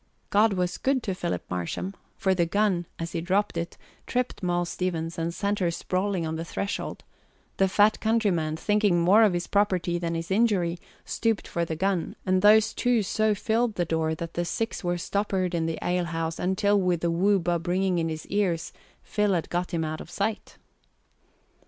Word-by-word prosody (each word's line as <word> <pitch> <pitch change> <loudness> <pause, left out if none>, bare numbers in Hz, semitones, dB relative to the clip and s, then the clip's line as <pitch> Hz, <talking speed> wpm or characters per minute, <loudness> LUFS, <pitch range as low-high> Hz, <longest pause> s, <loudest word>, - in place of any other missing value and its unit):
God 210 +1 +4
was 180 -1 -1
good 265 -2 +1
to 195 - -1
Philip 90 - -3
Marsham, 90 - -3 0.2
for 190 - +2
the 175 -2 +1
gun, 190 -2 +1
as 165 0 -4
he 165 - -2
dropped 190 +4 0
it, 170 0 -4 0.3
tripped 250 -3 -1
Moll 175 -1 0
Stevens 170 -2 -3
and 165 +1 -1
sent 200 +3 -1
her 180 -3 +2
sprawling 185 +1 -1
on 160 0 -3
the 165 - -3
threshold; 195 +4 -4 0.5
the 195 - +4
fat 205 +3 +4
countryman, 195 -9 +1
thinking 205 -2 +2
more 190 +6 +5
of 210 -4 +5
his 175 0 -1
property 185 -4 +1
than 170 -1 -2
his 165 +2 -4
injury, 190 -5 +2 0.3
stooped 225 -2 -1
for 170 0 -1
the 160 - -3
gun; 190 0 -1
and 185 0 +2
those 215 +1 +6
two 245 -3 +2
so 215 +2 +1
filled 225 +2 0
the 175 - 0
door 160 -1 0
that 165 +1 -6
the 175 - -1
six 225 +6 -3
were 175 0 0
stoppered 190 0 -1
in 165 -1 0
the 165 -1 -2
alehouse 165 -2 -1
until 195 +2 +2
with 180 -2 +1
the 170 - +1
whoo 195 +4 +3
bub 175 -1 -1
ringing 185 0 +1
in 165 0 0
his 155 -1 -5
ears 180 -5 -1 0.3
Phil 210 -2 +1
had 165 - -3
got 175 +1 -1
him 165 -1 -1
out 155 0 -4
of - - -10
sight. 205 +4 -3
180 Hz, 190 wpm, -26 LUFS, 170-205 Hz, 0.5 s, those